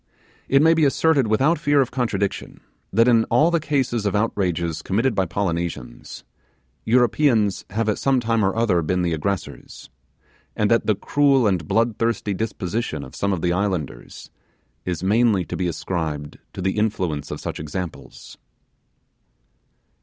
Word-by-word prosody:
It 135 Hz, +2 st, +4 dB
may 165 Hz, +1 st, +6 dB
be 160 Hz, -1 st, +2 dB
asserted 140 Hz, -2 st, +2 dB
without 135 Hz, +10 st, +2 dB
fear 145 Hz, -2 st, +2 dB
of 130 Hz, -2 st, +1 dB
contradictions 100 Hz, -6 st, -2 dB, 0.3 s
that 115 Hz, +1 st, +3 dB
in 115 Hz, -2 st, +5 dB
all 150 Hz, +9 st, +3 dB
the 170 Hz, -, +2 dB
cases 135 Hz, -7 st, -1 dB
of 100 Hz, -, -1 dB
outrages 90 Hz, -6 st, -1 dB
committed 115 Hz, +6 st, 0 dB
by 95 Hz, -3 st, 0 dB
Polynesians, 85 Hz, -10 st, -4 dB, 0.6 s
Europeans 120 Hz, -3 st, +2 dB
have 110 Hz, +2 st, -2 dB
at 105 Hz, -, 0 dB
some 135 Hz, -2 st, +2 dB
time 115 Hz, -2 st, 0 dB
or 95 Hz, -, +1 dB
other 110 Hz, -7 st, +2 dB
been 90 Hz, +3 st, -1 dB
the 85 Hz, -1 st, 0 dB
aggressors, 95 Hz, +4 st, -5 dB, 0.6 s
and -, -, +1 dB
that -, -, +2 dB
the -, -, +3 dB
cruel 140 Hz, -3 st, +2 dB
and 90 Hz, -6 st, 0 dB
bloodthirsty 115 Hz, 0 st, 0 dB
disposition 95 Hz, -5 st, -3 dB
of 65 Hz, -, -11 dB
some 100 Hz, -, -1 dB
of 90 Hz, -4 st, -2 dB
the 85 Hz, -1 st, +2 dB
islanders 90 Hz, -10 st, -4 dB, 0.5 s
is 90 Hz, -1 st, -3 dB
mainly 105 Hz, -2 st, +2 dB
to -, -, -5 dB
be 90 Hz, -, -1 dB
ascribed 80 Hz, -4 st, -4 dB
to 95 Hz, -, -6 dB
the 95 Hz, +3 st, 0 dB
influence 90 Hz, -9 st, -1 dB
of -, -, -5 dB
such -, -, -5 dB
examples. 80 Hz, +3 st, -7 dB
105 Hz, 155 wpm, -22 LUFS, 90-120 Hz, 0.6 s, may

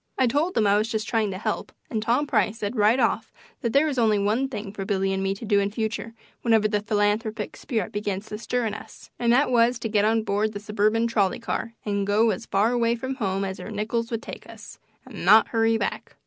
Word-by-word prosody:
I 260 Hz, -, +3 dB
told 295 Hz, +9 st, 0 dB
them 220 Hz, -, +3 dB
I 205 Hz, +1 st, +4 dB
was 215 Hz, +1 st, -1 dB
just 220 Hz, -2 st, -2 dB
trying 220 Hz, -3 st, +1 dB
to 190 Hz, -, -4 dB
help, 205 Hz, -, -3 dB, 0.2 s
and 220 Hz, -3 st, -1 dB
Tom 240 Hz, +7 st, +1 dB
Price 215 Hz, -5 st, +1 dB
said 210 Hz, +2 st, -3 dB
right 220 Hz, +3 st, +4 dB
off -, -, 0 dB, 0.3 s
that 235 Hz, -4 st, -1 dB
there 280 Hz, +5 st, +4 dB
was 285 Hz, -5 st, -1 dB
only 220 Hz, -3 st, +3 dB
one 215 Hz, +7 st, +1 dB
thing 205 Hz, -5 st, -6 dB
for 200 Hz, -, -5 dB
Billy 195 Hz, -1 st, 0 dB
and 190 Hz, -, -1 dB
me 195 Hz, 0 st, 0 dB
to 215 Hz, -, -8 dB
do 205 Hz, -1 st, +3 dB
in 200 Hz, 0 st, 0 dB
future 225 Hz, +1 st, -4 dB, 0.3 s
whenever 225 Hz, -3 st, +3 dB
the 210 Hz, -1 st, 0 dB
"philanthropic 210 Hz, +1 st, -1 dB
spirit 220 Hz, -9 st, -3 dB
began 205 Hz, -2 st, -2 dB
to 210 Hz, 0 st, -7 dB
stir" 245 Hz, +1 st, -1 dB
in 215 Hz, -, -2 dB
us, 215 Hz, -, -11 dB
and 235 Hz, -1 st, +2 dB
that 260 Hz, +3 st, +3 dB
was 240 Hz, 0 st, +3 dB
to 225 Hz, -1 st, -4 dB
get 210 Hz, -1 st, +2 dB
on 220 Hz, +1 st, +2 dB
board 215 Hz, +1 st, 0 dB
the 205 Hz, -, -5 dB
suburban 215 Hz, +2 st, +1 dB
trolley 210 Hz, -4 st, +1 dB
car 230 Hz, -1 st, -4 dB
and 200 Hz, -1 st, -1 dB
go 215 Hz, +2 st, +3 dB
as 230 Hz, -, -5 dB
far 210 Hz, +4 st, +2 dB
away 235 Hz, -1 st, +2 dB
from 260 Hz, +3 st, -4 dB
home 195 Hz, -6 st, -1 dB
as 190 Hz, 0 st, -5 dB
our -, -, -7 dB
nickels 225 Hz, +2 st, -2 dB
would 230 Hz, -1 st, -3 dB
take -, -, -9 dB
us, -, -, -12 dB, 0.3 s
and -, -, -9 dB
not 215 Hz, +5 st, +6 dB
hurry 225 Hz, -1 st, +2 dB
back. -, -, -4 dB
220 Hz, 245 wpm, -25 LUFS, 205-230 Hz, 0.3 s, not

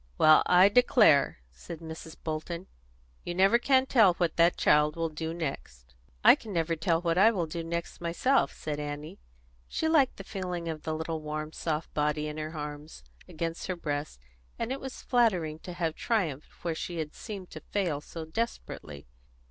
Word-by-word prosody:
"Well, 155 Hz, 0 st, +7 dB
I 180 Hz, +2 st, +7 dB
declare!" 210 Hz, -, +5 dB
said 60 Hz, -, -9 dB
Mrs. 160 Hz, 0 st, -9 dB
Bolton. 165 Hz, +3 st, -4 dB, 0.6 s
"You 175 Hz, -, -4 dB
never 195 Hz, +6 st, +5 dB
can 260 Hz, +1 st, +3 dB
tell 220 Hz, -9 st, +5 dB
what 170 Hz, -3 st, 0 dB
that 170 Hz, +1 st, +4 dB
child 150 Hz, 0 st, +3 dB
will 165 Hz, -1 st, -1 dB
do 160 Hz, +1 st, -4 dB
next." 65 Hz, -, -6 dB, 0.3 s
"I -, -, +9 dB
never 170 Hz, -6 st, -1 dB
can 165 Hz, -, -5 dB
tell 165 Hz, 0 st, +1 dB
what 170 Hz, +1 st, +1 dB
I 215 Hz, +3 st, +7 dB
will 190 Hz, -7 st, -1 dB
do 165 Hz, +1 st, -5 dB
next 170 Hz, +1 st, -5 dB
myself," 175 Hz, +11 st, +2 dB
said 150 Hz, -1 st, -5 dB
Annie. 150 Hz, -, -6 dB, 0.5 s
She 320 Hz, -, -1 dB
liked 305 Hz, -5 st, +3 dB
the 195 Hz, -, -7 dB
feeling 180 Hz, -3 st, -4 dB
of 160 Hz, -2 st, -4 dB
the 155 Hz, 0 st, -3 dB
little, 160 Hz, 0 st, -3 dB
warm, 155 Hz, 0 st, -4 dB
soft 160 Hz, -1 st, -3 dB
body 150 Hz, 0 st, 0 dB
in 150 Hz, 0 st, -6 dB
her 155 Hz, +1 st, -5 dB
arms, 150 Hz, +1 st, -7 dB, 0.2 s
against 165 Hz, -1 st, -4 dB
her 185 Hz, -, -2 dB
breast, 145 Hz, -, -4 dB, 0.4 s
and 230 Hz, -, -3 dB
it 270 Hz, -, -2 dB
was 265 Hz, -1 st, -8 dB
flattering 185 Hz, -, +1 dB
to 180 Hz, -, -8 dB
have 165 Hz, -2 st, -1 dB
triumphed 165 Hz, -, -1 dB
where 170 Hz, -, -1 dB
she 170 Hz, +2 st, -5 dB
had 155 Hz, -2 st, -4 dB
seemed 200 Hz, -5 st, -8 dB
to -, -, -7 dB
fail 175 Hz, -8 st, -2 dB
so 160 Hz, +1 st, -8 dB
desperately. 160 Hz, -, -5 dB
165 Hz, 180 wpm, -29 LUFS, 155-185 Hz, 0.6 s, I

